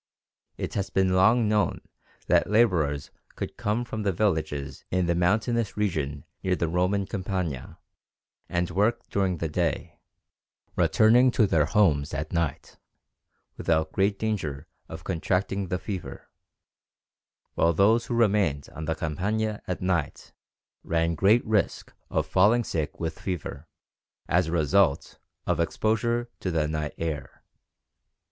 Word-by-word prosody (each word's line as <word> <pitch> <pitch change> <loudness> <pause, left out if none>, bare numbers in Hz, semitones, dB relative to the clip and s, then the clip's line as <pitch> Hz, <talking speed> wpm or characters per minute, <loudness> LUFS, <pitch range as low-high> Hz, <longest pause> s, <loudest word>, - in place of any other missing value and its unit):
It - - -4
has 100 -1 -2
long 95 +5 +4
been 110 - +1
known 105 -4 +1 0.5
that - - +3
labourers 85 -11 +2 0.2
could - - -5
come 110 +4 -1
from 110 -2 -5
the 100 -2 +1
villages 80 -7 -1
in 90 0 +1
the 85 - +1
mountainous 110 +6 +1
region 75 -9 -2 0.2
near 95 -1 +1
the 85 - -1
Roman 90 +4 +1
Campagna 95 - -4 0.7
and 85 0 -1
work 105 +6 +1
during 95 -3 +1
the 80 - -2
day, 80 -1 -2 0.8
returning 120 +4 +5
to 120 -3 +3
their 80 -6 +2
homes 80 -8 +2
at 75 +3 -4
night, 85 -4 -2 0.8
without 80 -1 0
great 100 +1 +1
danger 80 -11 -3 0.2
of - - -8
contracting 95 +3 -1
the 90 - -1
fever, 95 -1 -7 1.2
while 85 - +3
those 110 +7 +3
who 120 - -2
remained 100 -11 +2
on 80 - -6
the 80 +1 -1
Campagna 105 +8 -2
at 90 0 -3
night 85 -6 -2 0.5
ran 85 0 0
great 100 +8 +3
risk 110 -3 0 0.2
of - - 0
falling 105 +6 +4
sick 80 -8 -3
with 80 -1 -4
fever, 85 -4 -5 0.6
as 90 0 +2
a - - -3
result 80 -1 +2 0.3
of - - 0
"exposure 115 +7 0
to 95 - -3
the 80 -3 0
night 75 -1 -3
air." 80 -4 -5
90 Hz, 135 wpm, -26 LUFS, 80-105 Hz, 1.2 s, returning